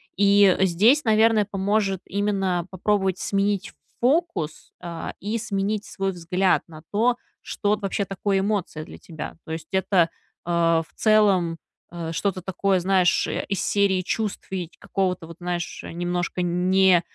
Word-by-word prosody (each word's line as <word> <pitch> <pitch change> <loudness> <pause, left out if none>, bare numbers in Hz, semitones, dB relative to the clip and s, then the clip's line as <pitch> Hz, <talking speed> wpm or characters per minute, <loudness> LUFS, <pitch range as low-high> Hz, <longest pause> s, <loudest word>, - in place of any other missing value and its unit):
И 200 -1 +5
здесь, 210 - +4
наверное, 220 -2 +4
поможет 195 -1 0
именно 195 -3 -1
попробовать 190 0 0
сменить 200 -1 -1 0.3
фокус, 250 - 0
э, 170 -1 -5
и 215 +4 -2
сменить 205 0 -2
свой 195 -1 -2
взгляд 180 +2 +1
на 155 -2 -12
то, 235 +4 +2 0.2
что 205 -1 0
вообще 200 0 -2
такое 195 +1 -1
эмоция 190 -6 -2
для - - -11
тебя. 160 -3 -8
То - - -9
есть, 160 -1 -5
это, 190 -3 +3 0.4
э, 175 - -7
в 165 -1 +2
целом, 200 -6 +3 0.3
э, 170 -1 -5
что-то 190 +1 -1
такое, 190 +1 0
знаешь, 185 0 +2
из 195 - -2
серии 200 -2 +2
чувств 210 +3 -3
и 180 -4 -3
ч - - -25
какого-то 180 -4 -2
вот, 170 0 -11
знаешь, 175 -1 -4
немножко 175 +1 -2
не, 180 +1 +4
э, - - -7
190 Hz, 145 wpm, -24 LUFS, 175-205 Hz, 0.4 s, И